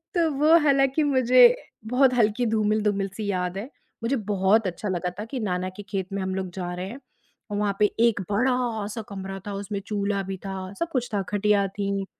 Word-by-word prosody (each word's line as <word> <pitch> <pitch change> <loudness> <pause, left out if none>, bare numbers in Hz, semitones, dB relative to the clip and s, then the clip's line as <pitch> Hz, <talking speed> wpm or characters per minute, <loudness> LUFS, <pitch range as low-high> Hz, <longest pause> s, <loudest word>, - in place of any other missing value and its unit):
तो 335 -2 +3
वो 315 +3 +7
हालाँकि 275 +1 +3
मुझे 255 -3 +6 0.3
बहुत 255 +2 +4
हल्की 235 0 +2
धूमिल-धूमिल 210 -2 +1
सी 215 - -3
याद 180 0 -2
है। 215 +7 -5 0.3
मुझे 240 +4 +1 0.2
बहुत 200 +2 +3
अच्छा 185 +3 -4
लगा 180 -1 -1
था 210 - -4
कि 265 - -3
नाना 185 -4 -1
के 205 - -7
खेत 190 -3 -2
में 200 - -2
हम 190 0 -2
लोग 190 -1 -3
जा 180 -2 -4
रहे 180 +1 -4
हैं 245 +6 -8 0.5
और 205 - -1
वहाँ 205 -1 0
पे 210 - +6
एक 230 -3 +3
बड़ा-सा 230 -2 0
कमरा 195 -1 -6
था, 205 - -4
उसमें 200 0 -4
चूल्हा 200 -1 -1
भी 190 0 -5
था, 190 0 -5
सब-कुछ 275 -8 -1
था, 200 - +1
खटिया 205 -1 +2
थी, 195 0 -2
210 Hz, 195 wpm, -25 LUFS, 195-245 Hz, 0.5 s, वो